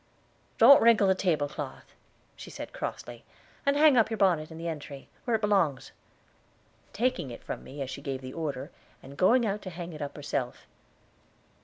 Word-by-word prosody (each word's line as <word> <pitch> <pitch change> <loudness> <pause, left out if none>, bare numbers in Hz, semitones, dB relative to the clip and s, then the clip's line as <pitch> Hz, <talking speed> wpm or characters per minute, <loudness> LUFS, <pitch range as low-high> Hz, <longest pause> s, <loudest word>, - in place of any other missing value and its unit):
"Don't 275 +5 +8
wrinkle 225 -3 +5
the 190 - +4
tablecloth," 160 -6 -3 0.4
she - - -10
said - - -8
crossly; - - -6 0.4
"and 280 0 +3
hang 300 -3 +6
up 220 -2 +4
your 225 - -3
bonnet 175 -7 +2
in 160 - -10
the 165 +1 -5
entry, 145 -3 -7 0.2
where 240 -3 +1
it 220 - -1
belongs," 195 - +1 1.0
taking 240 - -1
it 120 - -10
from - - -6
me 140 +1 -6
as 130 - -7
she 135 - -7
gave 135 -2 -4
the 130 0 -8
order, 145 -2 -4 0.3
and 135 +1 -11
going 235 - +4
out 210 0 -2
to 190 - -7
hang 175 -1 -7
it 155 - -9
up 145 -1 -5
herself. 140 -4 -4
170 Hz, 180 wpm, -28 LUFS, 140-215 Hz, 1.0 s, Don't